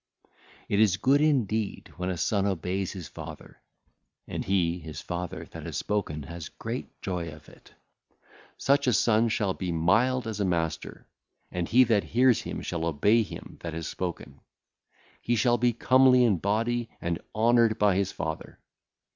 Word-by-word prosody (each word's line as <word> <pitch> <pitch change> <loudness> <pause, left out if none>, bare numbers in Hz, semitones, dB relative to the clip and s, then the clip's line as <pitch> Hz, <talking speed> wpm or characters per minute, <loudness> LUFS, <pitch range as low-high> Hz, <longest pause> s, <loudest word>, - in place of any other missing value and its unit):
It 100 - +1
is 105 -4 +4
good 140 +6 +3
indeed 110 -9 0
when 90 +1 -2
a 90 - -2
son 100 +5 +1
obeyeth 95 0 -2
his 90 -5 -7
father; - - -10 0.7
and - - -4
he 90 -2 +1
(his 80 -2 -8
father) 90 0 -5
that - - -8
hath - - -6
spoken 90 -8 -2
hath 85 +1 -9
great - - -6
joy 90 -3 -3
of 75 0 -13
it. - - -19 0.8
Such 140 0 +2
a 125 - +4
son 110 +2 +3
shall 105 -3 0
be 90 -2 -4
mild 110 +10 +2
as 110 -2 -4
a - - +1
master, 85 -4 -2 0.5
and 90 -1 -3
he 130 +3 +6
that 115 -4 +2
heareth 125 0 +3
him - - -5
shall 85 -1 -3
obey 100 +9 +3
him 110 - -8
that 85 -2 -6
hath 80 -1 -4
spoken. 85 -6 -5 0.8
He 120 - 0
shall 120 +2 +2
be 120 0 +3
comely 130 +2 +5
in 105 -7 +3
body 115 +4 0
and 85 -1 -2
honoured 115 0 +4
by 105 -3 +3
his 100 0 0
father. 80 -3 -5
100 Hz, 165 wpm, -27 LUFS, 85-115 Hz, 0.8 s, he